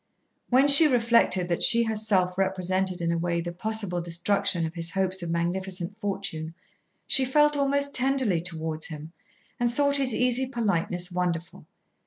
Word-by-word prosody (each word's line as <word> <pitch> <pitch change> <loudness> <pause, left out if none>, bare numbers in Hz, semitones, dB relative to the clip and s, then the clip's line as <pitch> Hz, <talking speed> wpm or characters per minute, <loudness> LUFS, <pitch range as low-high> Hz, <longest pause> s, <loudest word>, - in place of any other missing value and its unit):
When 260 +3 +3
she 285 +3 +10
reflected 230 -8 +1
that 170 - -2
she 235 0 +6
herself 210 -5 -1
represented 190 -1 -2
in 170 0 -1
a 170 - -2
way 170 0 -2
the 170 +1 -5
possible 200 -2 -2
destruction 170 0 -1
of 160 - -7
his 165 -1 -2
hopes 190 +1 -1
of 170 - -6
magnificent 180 +2 -4
fortune, 190 -6 -4 0.5
she 270 - +3
felt 295 +3 +2
almost 280 0 -1
tenderly 255 -9 +1
towards 160 -2 -5
him, 155 +1 -10 0.5
and 240 -1 0
thought 280 +2 0
his 260 -5 +1
easy 250 +1 0
politeness 195 -6 -2
wonderful. 175 -2 -5
190 Hz, 155 wpm, -25 LUFS, 170-240 Hz, 0.5 s, she